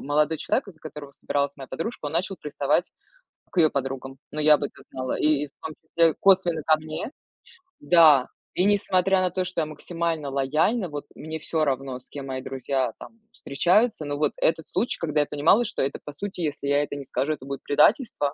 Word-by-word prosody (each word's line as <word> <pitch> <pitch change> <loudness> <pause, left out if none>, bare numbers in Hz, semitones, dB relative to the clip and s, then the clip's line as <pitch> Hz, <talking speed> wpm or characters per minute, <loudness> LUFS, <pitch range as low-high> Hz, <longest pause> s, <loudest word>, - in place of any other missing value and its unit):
молодой 150 +2 +2
человек, 210 - -1
э, - - -9
за 155 - -27
которого 150 -3 -9
собиралась 140 0 -2
моя 135 -2 -9
подружка, 165 - -5
он 145 - -4
начал 185 +4 -1
приставать 150 -3 0 0.6
к - - -12
её 160 -2 +6
подругам. 135 -1 -4
Ну, 155 - -3
я 150 0 +7
об 145 - -4
этом 145 - -7
знала. 130 -1 -3
И, 150 -1 +2
и - - -12
в - - -29
том 160 - -5
числе, 165 0 +3
косвенно 180 -4 +4
ко 155 - +6
мне. 155 - -6 0.7
Да, 150 -4 +6 0.3
и 180 - +1
несмотря 190 -2 +3
на 185 -1 +1
то, 185 +1 -1
что 180 -1 -3
я - - 0
максимально 165 -1 -3
лояльна, 155 - +1
вот, 145 -1 -6
мне 160 +1 -6
всё 160 -1 -1
равно, 135 -2 -2
с 130 - -19
кем 140 -1 -7
мои 130 -1 -4
друзья, 130 -2 -2
там, 230 - -12
встречаются. 180 - +1
Но 145 0 -3
вот 150 0 +1
этот 160 0 +1
случай, 240 - -1
когда 155 -2 -1
я - - +1
понимала, 150 +11 +3
что - - -3
это 135 +1 -1
по 150 - -8
сути, 195 +5 -6
если 145 -3 -2
я 145 +1 +3
это 145 - -5
не 140 - -6
скажу, 135 +3 -1
это 135 -3 -9
будет 140 0 -5
предательство, 150 - +2
150 Hz, 215 wpm, -25 LUFS, 140-170 Hz, 0.7 s, я